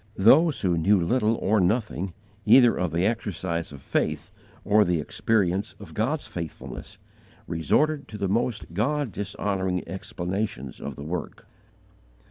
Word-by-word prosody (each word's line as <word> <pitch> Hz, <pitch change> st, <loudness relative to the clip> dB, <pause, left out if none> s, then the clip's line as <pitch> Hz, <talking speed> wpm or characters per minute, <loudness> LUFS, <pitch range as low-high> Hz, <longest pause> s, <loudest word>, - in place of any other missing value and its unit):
Those 145 Hz, -, +5 dB
who 90 Hz, -4 st, +1 dB
knew 100 Hz, +4 st, +4 dB
little 110 Hz, +5 st, +2 dB
or 110 Hz, 0 st, +1 dB
nothing, 95 Hz, -2 st, 0 dB, 0.3 s
either 120 Hz, -3 st, +6 dB
of 90 Hz, -3 st, -1 dB
the 85 Hz, +3 st, +1 dB
exercise 95 Hz, -7 st, -2 dB
of 70 Hz, -2 st, -11 dB
faith -, -, -1 dB, 0.3 s
or 105 Hz, +1 st, +5 dB
the 85 Hz, -3 st, +1 dB
experience 100 Hz, +4 st, 0 dB
of 100 Hz, -, -11 dB
God's 135 Hz, +8 st, -1 dB
faithfulness, 85 Hz, -3 st, -7 dB, 0.5 s
resorted 145 Hz, -, +1 dB
to 105 Hz, -, -8 dB
the 100 Hz, -, -1 dB
most 110 Hz, -3 st, -1 dB
God 140 Hz, -, 0 dB
dishonouring 95 Hz, -2 st, -2 dB
explanations 90 Hz, -, -4 dB
of 70 Hz, -, -5 dB
the 70 Hz, -, -8 dB
work. 85 Hz, +3 st, -5 dB
100 Hz, 135 wpm, -26 LUFS, 85-110 Hz, 0.5 s, either